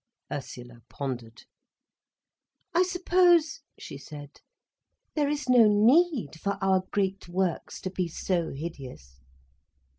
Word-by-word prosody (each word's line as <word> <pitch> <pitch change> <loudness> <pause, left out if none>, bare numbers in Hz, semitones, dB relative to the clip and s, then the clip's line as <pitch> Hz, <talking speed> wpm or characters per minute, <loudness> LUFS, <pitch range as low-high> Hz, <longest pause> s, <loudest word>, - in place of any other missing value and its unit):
_" - - -1
Ursula 125 -4 -9
pondered. 125 -4 -6 1.3
"I 345 - +4
suppose," 355 -4 +3 0.2
she 140 - -9
said, 145 0 -11 0.7
"there 295 -2 +1
is 295 -1 -3
no 245 -3 +6
need 225 - +3
for 200 +2 -2
our 190 -1 +2
great 195 -2 -2
works 180 -1 -2
to 185 - -4
be 185 -1 -2
so 170 0 -2
hideous." 130 - -9
190 Hz, 115 wpm, -27 LUFS, -, 1.3 s, no